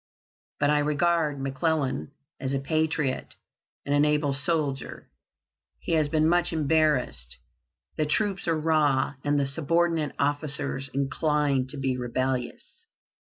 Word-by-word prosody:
"But 145 0 +3
I 150 - +3
regard 150 0 +1
McClellan 135 +1 -1 0.3
as 135 +1 -2
a - - 0
patriot 150 -1 -1 0.5
and 140 - 0
an 145 0 +4
able 150 -1 +2
soldier. 140 -2 -2 0.7
He - - -6
has 155 -3 +2
been 155 +1 +2
much 175 +1 +2
embarrassed. 145 - +1 0.6
The 155 - +1
troops 195 +4 0
are 165 -1 +1
raw, 150 -3 +2
and 145 0 +2
the 140 - +1
subordinate 165 +2 0
officers 145 -1 0
inclined 140 -1 0
to 145 - -3
be 135 -2 -1
rebellious. 125 0 -3
145 Hz, 125 wpm, -26 LUFS, 135-155 Hz, 0.7 s, an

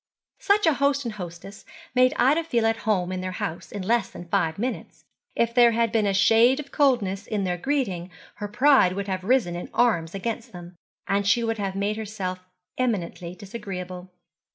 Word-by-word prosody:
Such 405 0 +3
a 320 - +5
host 280 0 +1
and 230 - -3
hostess 180 +1 -9 0.3
made 255 0 +4
Ida 295 +6 +3
feel 235 -8 0
at 225 0 +2
home 185 -4 +1
in 185 0 -3
their 185 0 -4
house 165 -1 -5
in 200 -2 -5
less 235 +5 +1
than 175 - -10
five 165 -4 0
minutes. 245 +5 -5 0.3
If 235 0 +1
there 240 -1 +6
had 230 -1 +1
been 215 -2 +2
a 200 - +1
shade 230 +7 +5
of 280 -2 -8
coldness 225 -8 +1
in 210 -3 -1
their 180 -1 -1
greeting 195 -10 -1 0.3
her 205 0 -4
pride 250 -4 +4
would 200 +1 -4
have 185 -1 -3
risen 210 -6 +2
in 175 - -6
arms 175 -8 +2
against 230 +3 -4
them, 175 0 -10 0.3
and 200 0 +1
she 235 +4 +3
would 225 -1 -1
have 195 -1 -2
made 205 +2 -1
herself 195 -4 -4 0.4
eminently 180 -7 -2
disagreeable. 185 -3 -7
210 Hz, 190 wpm, -25 LUFS, 185-240 Hz, 0.4 s, there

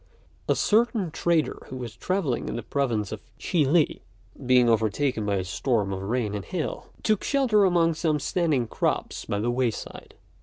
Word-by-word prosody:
A - - +4
certain 215 -5 +2
trader 165 0 +1
who 130 - -6
was 120 -3 -7
travelling 175 -6 -1
in - - -4
the 120 - -4
province 115 -6 -1
of - - -6 0.2
Chih 160 -5 +1
li, 155 +1 +2 0.4
being 125 -1 +5
overtaken 110 +1 +1
by 100 - +1
a 95 - -1
storm 100 +1 0
of 95 - -4
rain 110 +1 -1
and 100 -2 -3
hail, 175 - -4 0.2
took 215 -2 +1
shelter 245 -8 +3
among 170 -3 +3
some 155 -1 0
standing 150 -4 +1
crops 110 - -2
by 100 - -2
the 115 +4 0
way 125 0 +1
side. 110 - -9
130 Hz, 180 wpm, -26 LUFS, 110-170 Hz, 0.4 s, being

